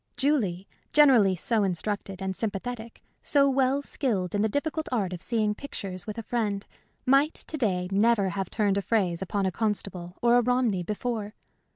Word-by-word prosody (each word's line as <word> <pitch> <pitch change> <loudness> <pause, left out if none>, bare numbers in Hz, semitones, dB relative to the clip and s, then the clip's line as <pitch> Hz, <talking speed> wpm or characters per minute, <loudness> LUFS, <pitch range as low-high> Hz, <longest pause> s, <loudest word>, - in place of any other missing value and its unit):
Julie, 210 -11 0 0.3
generally 250 -11 +6
so 215 +5 +1
instructed 195 +1 -2
and 190 0 -2
sympathetic, 225 +2 -4 0.2
so 280 -1 +4
well 270 +1 +2
skilled 200 - -2
in 205 - +1
the 220 - +2
difficult 310 +5 -2
art 200 -7 0
of 175 - -6
seeing 215 -2 0
pictures 195 -7 -6
with 215 - -5
a 230 - -4
friend, 210 -4 -2 0.4
might, 275 +4 +4
to - - -7
day, 190 -10 0
never 205 0 +3
have 190 0 -3
turned 205 -3 +1
a - - -2
phrase 190 -5 0
upon 195 +1 -1
a 190 - +1
Constable 195 -4 -2
or 240 0 +4
a - - +5
Romney 245 -5 +1
before. 210 +2 -3
210 Hz, 175 wpm, -27 LUFS, 190-245 Hz, 0.4 s, generally